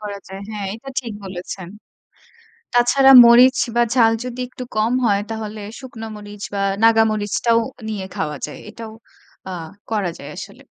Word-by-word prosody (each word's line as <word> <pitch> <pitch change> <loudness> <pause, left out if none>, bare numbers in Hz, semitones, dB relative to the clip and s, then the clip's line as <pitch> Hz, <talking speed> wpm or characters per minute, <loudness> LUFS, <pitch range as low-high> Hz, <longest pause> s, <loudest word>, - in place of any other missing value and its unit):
করা 205 -1 -6
যায়। 195 0 -8
হ্যাঁ, 210 -2 -4
এটা 230 +5 -11
ঠিক 235 -4 -7
বলেছেন। 185 -1 -7 1.1
তাছাড়া 265 +3 +5
মরিচ 250 +2 +7 0.2
বা, 240 - +4
ঝাল 230 -3 +5
যদি 250 0 -6
একটু 255 - -8
কম 220 +3 +2
হয়, 200 -2 +2
তাহলে 215 -1 -5 0.2
শুকনো 240 -4 -8
মরিচ 205 -1 -10
বা, 200 - -1 0.2
নাগা 225 0 +6
মরিচটাও 215 +2 +1 0.3
নিয়ে 205 -3 -4
খাওয়া 150 -1 -3
যায়। - - -10
এটাও 225 0 -9 0.6
আ - - -5 0.4
করা 205 -5 0
যায় - - -10
আসলে। - - -10
220 Hz, 155 wpm, -20 LUFS, 205-240 Hz, 1.1 s, মরিচ